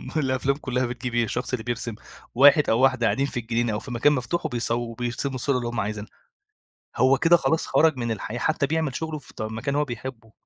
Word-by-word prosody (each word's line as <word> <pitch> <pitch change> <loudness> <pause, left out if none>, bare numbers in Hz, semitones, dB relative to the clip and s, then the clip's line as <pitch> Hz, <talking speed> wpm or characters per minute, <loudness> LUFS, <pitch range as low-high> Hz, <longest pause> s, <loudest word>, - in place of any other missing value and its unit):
ما 155 - +2
الأفلام 130 +1 0
كلها 130 -3 -1
بتجيب 125 0 -5
إيه 120 - +3
الشخص 125 +3 -3
اللي 110 - -1
بيرسم 120 -1 -3 0.4
واحد 145 +3 +6
أو 115 - +3
واحدة 130 -2 +3
قاعدين 135 +3 +1
في 125 - -3
الجنينة 115 -1 -1
أو 105 - -1
في 130 - -9
مكان 120 +5 +3
مفتوح 150 +6 -2
وبيصو 120 -5 0 0.2
وبيرسموا 120 +3 -3
الصورة 135 +1 0
اللي 120 -1 -3
هُم 120 0 -3
عايزينها. 105 +1 -4 0.9
هو 130 +1 +4
كده 170 +4 +5
خلاص 160 -1 0
خرج 155 -3 +3
من 120 -2 -2
الحياة 110 +2 -4
حتى 155 +1 +1
بيعمل 160 -3 -1
شغله 160 -2 -4
في - - -17
ط - - -8
مكان 115 +6 -3
هو 150 0 +2
بيحبه. 120 -2 -7
125 Hz, 220 wpm, -25 LUFS, 120-140 Hz, 0.9 s, واحد